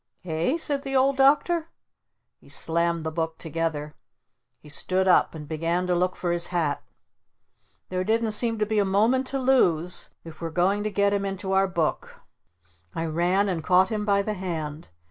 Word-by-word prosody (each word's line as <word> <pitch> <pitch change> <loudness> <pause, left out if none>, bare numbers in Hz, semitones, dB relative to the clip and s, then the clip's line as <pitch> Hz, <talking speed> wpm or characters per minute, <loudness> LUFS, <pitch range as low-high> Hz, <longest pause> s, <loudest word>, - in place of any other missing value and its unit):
"Eh?" 170 - 0
said 290 -4 -1
the 270 -1 -4
Old 265 +1 +3
Doctor. 300 +5 +3 0.7
He - - -20
slammed 170 0 0
the 160 - -3
book 160 0 -3
together. 160 -2 -3 0.6
He - - -18
stood 185 +5 0
up 180 - +4
and 150 -2 -8
began 165 +3 -1
to 180 - +1
look 180 +1 +1
for 175 -1 -2
his 175 0 +2
hat. 150 -5 -1 1.1
There 185 0 -1
didn't 225 +2 +1
seem 225 +1 0
a 215 -1 +2
moment 220 +7 +2
to 275 - -2
lose 180 -11 +1
if 165 -1 -12
we 165 - -2
we're - - -7
going 195 +4 +2
to - - +1
get 200 0 +1
him 200 -1 0
into 195 0 -4
our 195 0 +3
book. 170 -4 -2 0.7
I 165 - -2
ran 175 +5 +1
and 175 -4 -2
caught 185 +2 +4
him 215 -2 -2
by 200 -1 +2
the 215 - -2
hand. 165 -5 -5
185 Hz, 180 wpm, -25 LUFS, 165-210 Hz, 1.1 s, up